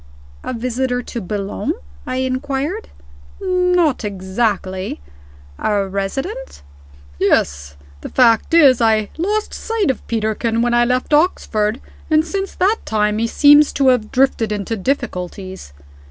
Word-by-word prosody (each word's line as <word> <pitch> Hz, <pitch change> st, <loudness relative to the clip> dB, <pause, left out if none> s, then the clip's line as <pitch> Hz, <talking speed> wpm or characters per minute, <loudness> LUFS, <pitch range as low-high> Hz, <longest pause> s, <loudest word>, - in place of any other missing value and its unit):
"A -, -, -4 dB
visitor 250 Hz, +1 st, -2 dB
to 235 Hz, -, -6 dB
Boulogne?" 200 Hz, +1 st, -3 dB, 0.3 s
I -, -, -2 dB
inquired. 265 Hz, -, -2 dB, 0.5 s
"Not 360 Hz, -7 st, +1 dB
exactly." 190 Hz, -, -2 dB, 0.6 s
"A 205 Hz, -2 st, 0 dB
resident?" 270 Hz, -, -4 dB, 0.6 s
"Yes. 70 Hz, 0 st, +1 dB, 0.3 s
The -, -, -7 dB
fact 245 Hz, +5 st, +3 dB
is, 275 Hz, -7 st, +6 dB
I 220 Hz, -2 st, +2 dB
lost 420 Hz, +5 st, -1 dB
sight 450 Hz, -9 st, 0 dB
of 255 Hz, -, -10 dB
Peterkin 225 Hz, +1 st, 0 dB
when 240 Hz, 0 st, +1 dB
I 240 Hz, 0 st, +4 dB
left 250 Hz, +4 st, -1 dB
Oxford 230 Hz, -, +1 dB, 0.3 s
and 310 Hz, 0 st, +3 dB
since 390 Hz, +3 st, -4 dB
that 410 Hz, +5 st, +2 dB
time 210 Hz, 0 st, 0 dB
he 230 Hz, -, +1 dB
seems 290 Hz, +4 st, +6 dB
to 270 Hz, -1 st, +3 dB
have 245 Hz, -4 st, +1 dB
drifted 250 Hz, -4 st, +2 dB
into 210 Hz, +2 st, -2 dB
difficulties. 190 Hz, -, -4 dB
240 Hz, 125 wpm, -18 LUFS, 210-290 Hz, 0.6 s, is